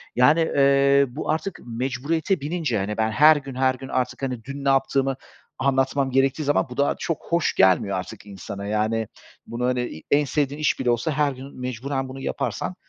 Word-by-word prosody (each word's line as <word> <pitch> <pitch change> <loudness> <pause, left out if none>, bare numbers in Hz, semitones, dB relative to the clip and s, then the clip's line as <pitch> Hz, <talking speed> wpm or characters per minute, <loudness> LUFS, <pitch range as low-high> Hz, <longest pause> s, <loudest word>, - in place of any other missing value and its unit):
yani, 145 +7 +5
eee, 140 -2 +4
bu 135 +6 -6
artık 160 +4 -3
mecburiyete 135 - -1
binince, 150 -5 -1
hani, 105 +2 -3
ben 110 0 +1
her 150 +7 +6
gün 135 -2 -7
her 130 0 +2
gün 135 +1 -9
artık, 130 0 -2
hani, 125 -4 -3
dün 140 +1 -7
ne - - +3
yaptığımı 135 0 +1 0.4
anlatmam 135 0 +1
gerektiği 135 +3 +2
zaman 145 -1 +1
bu 125 - -9
da 140 0 +2
çok 165 -4 -3
hoş 170 -1 +1
gelmiyor 95 +1 +3
artık 95 +2 -7
insana. 100 0 -8
Yani, 110 +1 0 0.4
bunu, 120 +1 -3
hani, 125 0 +1
i 80 - -10
en 145 +1 +4
sevdiğin 145 +1 -1
iş 150 - +1
bile 125 - 0
olsa 120 +6 0
her 145 -1 +1
gün 135 +1 -10
mecburen 130 +2 -3
bunu 135 +1 -8
yaparsan 180 - -3
135 Hz, 190 wpm, -23 LUFS, 120-140 Hz, 0.4 s, her